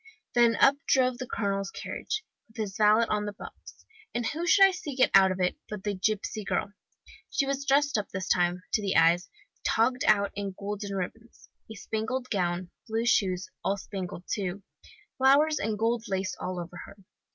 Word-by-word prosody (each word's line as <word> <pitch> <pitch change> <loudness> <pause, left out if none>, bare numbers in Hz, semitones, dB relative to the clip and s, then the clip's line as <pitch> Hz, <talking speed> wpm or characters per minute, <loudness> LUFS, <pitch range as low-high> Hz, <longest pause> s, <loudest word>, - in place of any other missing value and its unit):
Then 235 -1 +4
up 275 +1 +5
drove 255 -2 +3
the 255 - -5
colonel's 195 -3 -2
carriage, 430 - -4 0.2
with 220 - -21
his 205 -3 -3
valet 215 +2 +5
on 210 -1 0
the 205 - -4
box. - - -12 0.3
And 240 -1 -1
who 330 +8 -2
should 390 +2 +7
I 390 - +4
see 360 -7 -6
get 255 - +3
out 190 -1 +7
of 185 - -4
it, 180 0 0
but 210 -3 -6
the 205 - -1
gipsy 210 +2 -2
girl! 200 +1 -2 0.6
She 275 - 0
was 275 0 -2
dressed 280 -3 +3
up, 205 - -5
this 185 -1 -4
time, 180 0 +1
to - - +2
the 195 -2 -1
eyes, 170 +3 +4 0.3
togged 250 +3 +2
out 200 -2 +3
in 200 -1 -5
golden 200 0 -4
ribbons 220 +5 -7 0.2
a - - -7
spangled 235 +5 -3
gown, 175 -2 -1 0.2
blue 225 +1 -1
shoes, 185 -5 +1
all 200 - 0
spangled 185 -3 -6
too, 195 -1 -3 0.6
flowers 290 +4 +4
and 215 0 -1
gold 230 +1 0
lace 190 -1 -2
all 180 -1 -4
over 175 0 -7
her. 200 - -14
210 Hz, 185 wpm, -28 LUFS, 190-240 Hz, 0.6 s, should